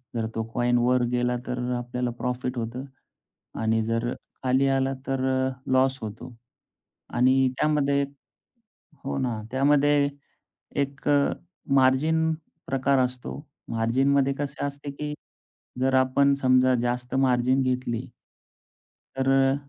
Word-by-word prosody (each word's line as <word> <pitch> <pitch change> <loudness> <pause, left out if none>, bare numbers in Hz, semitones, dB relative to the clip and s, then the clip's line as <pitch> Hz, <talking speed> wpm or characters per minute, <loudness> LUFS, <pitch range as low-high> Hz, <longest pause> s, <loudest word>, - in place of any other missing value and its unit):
जर 115 - -1
तो 115 - -1
कॉइन 120 0 +2
वर 125 +1 +3
गेला, 125 0 +1
तर 125 0 -3
अ, 125 - 0
आपल्याला 120 0 -3
प्रॉफिट 125 0 -2
होतं 120 +3 -4 0.8
आणि 110 0 +2
जर 115 +2 -1 0.3
खाली 130 +1 +3
आला 135 0 +1
तर 135 -1 0
अ, 130 0 +1 0.2
लॉस 130 +1 +3
होतो. 115 +3 -8 0.7
आणि 130 +1 +3
त्यामध्ये 140 -2 +2 1.0
हो 140 - -2
ना. 120 -4 -2
त्यामध्ये 145 +1 +3 0.7
एक 140 +1 -8
अ, 145 -1 +3 0.4
मार्जिन 155 +5 +3 0.3
प्रकार 135 0 +2
असतो. 125 +2 -2 0.3
मार्जिनमध्ये 135 +5 +2
कसे 140 -1 -3
असते, 140 0 -5
की 150 +1 -5 0.7
जर 135 +1 +2
आपण 130 +2 +4
समजा 130 0 +4
जास्त 125 +1 -2
मार्जिन 130 0 +3
घेतली 125 -1 -2 1.1
तर 135 0 0
अ, 135 0 +4
130 Hz, 120 wpm, -26 LUFS, 125-140 Hz, 1.1 s, आपण